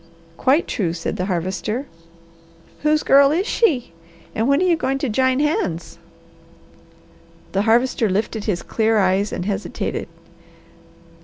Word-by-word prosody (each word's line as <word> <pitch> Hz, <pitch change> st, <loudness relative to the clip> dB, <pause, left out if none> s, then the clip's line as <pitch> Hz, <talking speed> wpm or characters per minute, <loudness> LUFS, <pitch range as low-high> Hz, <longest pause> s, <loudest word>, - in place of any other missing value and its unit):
"Quite 275 Hz, -, +2 dB
true!" 175 Hz, -6 st, -1 dB
said 165 Hz, -1 st, -4 dB
the 180 Hz, -, -1 dB
Harvester. 190 Hz, -, -2 dB, 1.0 s
"Whose 305 Hz, 0 st, +2 dB
girl 275 Hz, 0 st, +6 dB
is 355 Hz, +6 st, +1 dB
she, 285 Hz, -, +1 dB, 0.4 s
and 225 Hz, +2 st, 0 dB
when 280 Hz, +1 st, +3 dB
are 370 Hz, -, +2 dB
you 350 Hz, -2 st, +4 dB
going 270 Hz, -3 st, -1 dB
to 275 Hz, -1 st, -2 dB
jine 260 Hz, +3 st, +2 dB
hands?" 195 Hz, -, -1 dB, 1.5 s
The 195 Hz, -, +1 dB
Harvester 235 Hz, -1 st, +2 dB
lifted 210 Hz, +2 st, -2 dB
his 190 Hz, -5 st, -1 dB
clear 220 Hz, 0 st, +1 dB
eyes 195 Hz, +1 st, +2 dB
and 180 Hz, -, -4 dB
hesitated. 200 Hz, -1 st, -3 dB
225 Hz, 135 wpm, -21 LUFS, 195-280 Hz, 1.5 s, girl